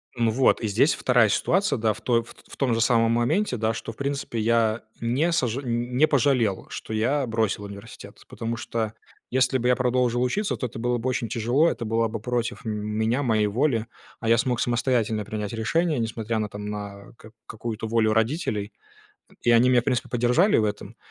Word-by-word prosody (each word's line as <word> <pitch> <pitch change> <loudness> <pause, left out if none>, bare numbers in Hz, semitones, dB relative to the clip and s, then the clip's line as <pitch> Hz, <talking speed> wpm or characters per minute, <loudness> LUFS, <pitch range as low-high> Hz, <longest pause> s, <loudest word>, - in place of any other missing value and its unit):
Ну, 115 -2 +1
вот. 130 +3 +3
И 110 - -1
здесь 115 +9 +3
вторая 125 -4 +3
ситуация, 190 - +1
да, 110 -1 +1
в 110 - -13
той 115 0 +2
ф 115 - -13
т - - -22
ф - - -30
т - - -21
в - - -11
том 130 -4 +1
же 115 - +1
самом 115 0 +3
моменте, 125 - +1
да, 110 +1 0
что, 115 - -6
в 110 - -15
принципе, 140 -4 -3
я 115 0 +2 0.2
не 130 +9 +1
сожа 130 -5 0
н 120 0 -3
не 155 +3 +5
пожалел, 125 -7 +1
что - - -7
я 130 +6 +1
бросил 110 -3 -1
университет, 100 0 -11
потому 115 +1 -4
что 110 -2 -3 0.4
если 130 +1 +2
бы 125 - -1
я 125 - +4
продолжил 125 0 +1
учиться, 200 +12 0
то - - -3
это 120 -2 -6
было 120 +1 0
бы 120 +3 -4
очень 125 -2 -1
тяжело, 120 +8 +2
это 115 - -4
была 115 +1 +1
бы 115 0 -5
против 120 +1 -3
меня, 110 +4 -1
моей 110 -5 +2
воли, 115 +1 +1 0.3
а 115 - -4
я 115 +1 +5
смог 120 0 0
самостоятельно 120 -3 0
принять 105 0 -5
решение, 155 +6 0
несмотря 110 0 -2
на 105 -1 -2
там 105 0 -7
на 100 -1 -7
к 110 -1 -15
какую-то 110 0 -5
волю 110 -1 +2
родителей. 110 - -1 0.7
И 120 - +3
они 120 +2 +5
меня, 125 - +5
в - - -21
принципе, 125 -2 -1
поддержали 125 - +3
в 110 - +2
этом, 105 +1 -4
115 Hz, 210 wpm, -25 LUFS, 110-125 Hz, 0.7 s, не